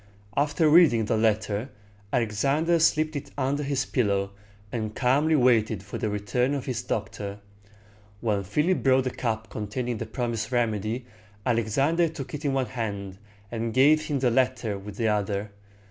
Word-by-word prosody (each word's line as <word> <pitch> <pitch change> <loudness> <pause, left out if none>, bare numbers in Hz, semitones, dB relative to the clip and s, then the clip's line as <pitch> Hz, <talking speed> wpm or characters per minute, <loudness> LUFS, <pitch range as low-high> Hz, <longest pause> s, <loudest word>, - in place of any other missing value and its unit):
After 150 +3 +2
reading 150 -9 +6
the 115 - +1
letter, 110 +1 0 0.4
Alexander 140 +10 +1
slipped 155 -1 +2
it 145 - -5
under 140 +2 0
his 140 -2 -1
pillow, 100 -5 0 0.4
and 110 -2 -3
calmly 145 +5 +3
waited 115 -6 +3
for 100 - -6
the 110 - -1
return 125 +7 0
of 140 - -4
his 120 -3 -2
doctor. 100 -2 -4 0.8
When 105 -3 0
Philip 150 - +1
brought 130 -1 +4
the 130 - -2
cup 110 -3 -3
containing 115 +3 -3
the 115 - -4
promised 115 -1 -3
remedy, 115 0 -1 0.4
Alexander 135 +9 +2
took 135 -4 -8
it 150 +1 -5
in 140 -2 0
one 135 -1 +1
hand, 100 -6 -5 0.3
and 115 -1 -3
gave 150 +4 +5
him 145 - -1
the 125 -2 +2
letter 120 -3 +1
with 100 +1 -9
the 115 - +1
other. 105 -1 -1
120 Hz, 160 wpm, -26 LUFS, 105-140 Hz, 0.8 s, reading